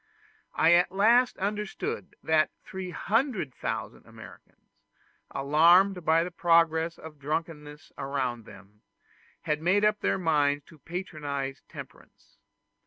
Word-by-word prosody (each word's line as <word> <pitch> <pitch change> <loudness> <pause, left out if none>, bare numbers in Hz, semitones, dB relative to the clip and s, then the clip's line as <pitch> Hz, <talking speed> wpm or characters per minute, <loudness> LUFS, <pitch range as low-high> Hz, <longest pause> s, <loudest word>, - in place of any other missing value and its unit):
I 165 +2 +5
at 175 +1 +4
last 235 +6 +3
understood 205 -1 -4
that 155 -1 +3 0.2
300,000 190 - -3
Americans, - - -16 0.5
alarmed 170 +7 +4
by 160 +1 +3
the 180 - -6
progress 165 -1 +2
of 155 -2 -12
drunkenness 150 0 -5
around 130 -4 -3
them, 105 -1 -16 0.6
had 150 0 -2
made 195 +5 +3
up 210 0 +2
their - - 0
minds 145 -5 +1
to 160 - -17
patronize 145 -6 -5
temperance. - - -13
165 Hz, 105 wpm, -28 LUFS, 145-185 Hz, 0.6 s, I